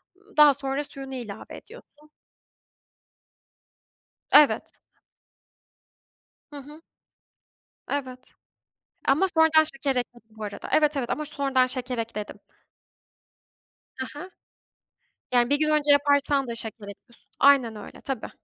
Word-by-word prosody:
Imm, 400 -3 -25
daha 295 -2 +8
sonra 275 +1 -3
suyunu 270 -2 -9
ilave 225 -5 -8
ediyorsun. 305 -10 -17 2.2
Evet. 295 -1 +4 1.7
Hı 290 - -9
hı. 300 +4 -14 1.1
Evet. 255 -3 -5 0.7
Ama 310 +8 +3
sonradan 320 -1 +6
şeker 275 -3 -2
ekledim 240 -2 -5
bu 215 - -7
arada 205 - -7
Evet, 300 -1 +3
evet, 245 -3 -3
ama 305 - -2
sonradan 275 -3 +1
şeker 255 -1 -4
ekledim. 220 -2 -5 1.6
Ha 260 - -3
ha. 360 +6 -9 1.0
Yani 240 -1 +3
1 285 +1 +2
gün 305 - +1
önce 300 -1 +3
yaparsan 285 -1 +3
da 235 - -4
şeker 220 -2 -7
ekliyorsun. 215 +4 -14
Aynen 265 -5 +4
öyle, 210 - -11
tabii. 265 -5 -5
275 Hz, 115 wpm, -25 LUFS, 245-295 Hz, 2.2 s, daha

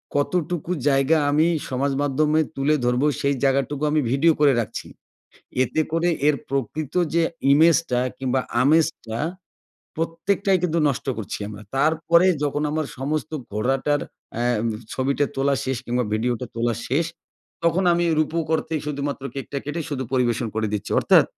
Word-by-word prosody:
কতটুকু 175 +3 -1 0.2
জায়গা 135 +3 +3
আমি 155 +3 +4 0.2
সমাজ 135 +2 0
মাধ্যমে 150 +2 +2 0.2
তুলে 140 +3 +2
ধরবো 125 +4 +2 0.2
সেই 140 0 +1
জায়গাটুকু 140 +2 +1
আমি 155 -1 +3
ভিডিও 155 +4 +4
করে 145 -2 +5
রাখছি। 110 - -4 0.8
এতে 155 - -1
করে 165 +1 +2 0.2
এর 145 - +3
প্রকৃত 140 +3 -3 0.2
যে 170 - +4 0.3
ইমেজটা 160 -4 +4 0.2
কিংবা 130 0 0 0.2
আমেজটা 150 -6 +1 0.8
প্রত্যেকটাই 185 +4 0
কিন্তু 170 -1 +1
নষ্ট 135 0 -3
করছি 105 - -4
আমরা। 105 0 -9
তারপরে 160 +4 +3 0.2
যখন 145 +1 0
আমার 155 -1 -1
সমস্ত 155 +3 -2 0.2
ঘোড়াটার 135 +6 +1 0.3
অ্যাম 120 -1 0 0.3
ছবিটা 140 +2 0
তোলা 140 +1 +2
শেষ 130 -1 -1
কিংবা 120 0 0
ভিডিওটা 120 +2 -1
তোলা 115 0 +1
শেষ, 155 +6 +1 0.6
তখন 170 +3 +2
আমি 175 0 +1
রুপক 160 +1 0
অর্থেই 155 0 -3
শুধুমাত্র 140 -1 -3
কেকটা 140 +1 -4
কেটে 150 +3 -3
শুধু 130 -2 -2
পরিবেশন 120 -2 +1
করে 110 0 0
দিচ্ছি। 105 - -3
অর্থাৎ, - - +6
140 Hz, 145 wpm, -23 LUFS, 130-160 Hz, 0.8 s, অর্থাৎ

